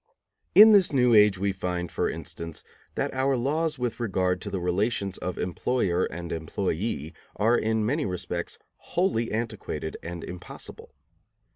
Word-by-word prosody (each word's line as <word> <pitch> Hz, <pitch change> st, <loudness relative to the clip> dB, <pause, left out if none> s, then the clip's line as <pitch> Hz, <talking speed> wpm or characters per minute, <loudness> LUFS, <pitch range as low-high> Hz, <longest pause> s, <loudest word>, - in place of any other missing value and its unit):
In 215 Hz, +2 st, +10 dB
this 200 Hz, -5 st, +5 dB
new 125 Hz, -4 st, +4 dB
age 105 Hz, -3 st, +6 dB
we 100 Hz, +1 st, 0 dB
find, 90 Hz, -2 st, -3 dB
for -, -, 0 dB
instance, 85 Hz, -1 st, -6 dB, 0.3 s
that -, -, -1 dB
our 135 Hz, 0 st, +1 dB
laws 150 Hz, +5 st, 0 dB
with 125 Hz, -2 st, -3 dB
regard 95 Hz, -5 st, 0 dB
to -, -, -4 dB
the 95 Hz, -, -2 dB
relations 95 Hz, +2 st, 0 dB
of 90 Hz, -, -4 dB
employer 90 Hz, -1 st, 0 dB
and 85 Hz, +1 st, -6 dB
employee 80 Hz, 0 st, -2 dB, 0.2 s
are 115 Hz, +3 st, +3 dB
in 110 Hz, -1 st, +1 dB
many 145 Hz, +4 st, 0 dB
respects 90 Hz, -1 st, -4 dB, 0.2 s
wholly 170 Hz, -11 st, 0 dB
antiquated 110 Hz, -7 st, -3 dB
and 85 Hz, 0 st, -6 dB
impossible. 90 Hz, 0 st, -9 dB
105 Hz, 145 wpm, -27 LUFS, 90-125 Hz, 0.3 s, In